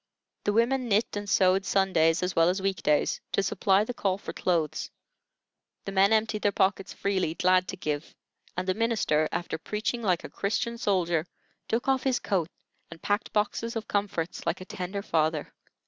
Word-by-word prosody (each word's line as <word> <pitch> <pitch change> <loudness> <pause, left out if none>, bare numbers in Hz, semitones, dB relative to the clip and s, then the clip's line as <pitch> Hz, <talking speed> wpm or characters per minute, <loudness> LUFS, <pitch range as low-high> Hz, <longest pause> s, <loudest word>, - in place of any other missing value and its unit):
The 205 - +2
women 245 +3 +2
knit 210 +2 +1
and 205 0 -4
sewed 190 0 +4
Sundays 185 -4 +2
as 180 -1 -1
well 165 +1 +5
as 185 +2 0
weekdays, 190 -6 +1
to 200 - +2
supply 195 0 +2
the 245 - -4
call 195 -5 0
for - - -7
clothes; 160 -4 -1 1.0
the 195 - -4
men 195 +1 +4
emptied 220 -1 +1
their 205 - +2
pockets 195 0 +1
freely, 190 -5 -1
glad 185 0 +3
to 190 - -5
give; 150 -3 -4 0.4
and 185 +1 -2
the 185 - +2
minister, 200 -8 +1
after 175 -2 -3
preaching 215 +6 -2
like 185 -6 +1
a - - -5
Christian 235 +3 -2
soldier, 175 -6 +1 0.4
took 235 +4 -1
off 265 -1 +3
his 260 -2 +1
coat 175 -5 -1 0.4
and 165 - -11
packed 205 +2 0
boxes 225 +2 -1
of 225 -1 -4
comforts 200 -4 -2
like - - 0
a 185 - -8
tender 190 +2 -5
father. 160 -4 0
195 Hz, 180 wpm, -28 LUFS, 175-210 Hz, 1.0 s, well